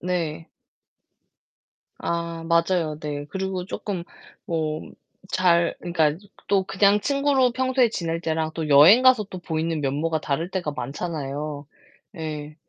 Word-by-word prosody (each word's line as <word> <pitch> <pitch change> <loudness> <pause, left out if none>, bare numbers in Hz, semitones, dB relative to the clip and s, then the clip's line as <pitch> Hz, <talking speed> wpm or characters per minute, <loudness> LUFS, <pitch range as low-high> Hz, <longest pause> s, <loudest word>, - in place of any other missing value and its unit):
네. 165 -3 -3 1.5
아 170 -1 -3
맞아요. 170 -2 +1
네. 145 -1 -4
그리고 190 -1 -3
쪼끔 190 -2 -4 0.4
뭐 155 -2 -2 0.5
잘 170 -2 +3
그니까 160 -4 +1 0.3
또 195 -1 +3
그냥 200 +2 +3
친구로 275 -2 +2
평소에 255 -1 +2
지낼 165 -5 -3
때랑 160 -1 -1
또 160 -2 -4
여행 155 - +8
가서 255 -4 +5
또 190 -2 -9
보이는 160 -2 -2
면모가 150 +3 -1
다를 160 +6 -2
때가 180 -5 -2
많잖아요. 145 +1 -4 0.5
예 150 -1 -5
170 Hz, 235 characters per minute, -24 LUFS, 155-190 Hz, 1.5 s, 여행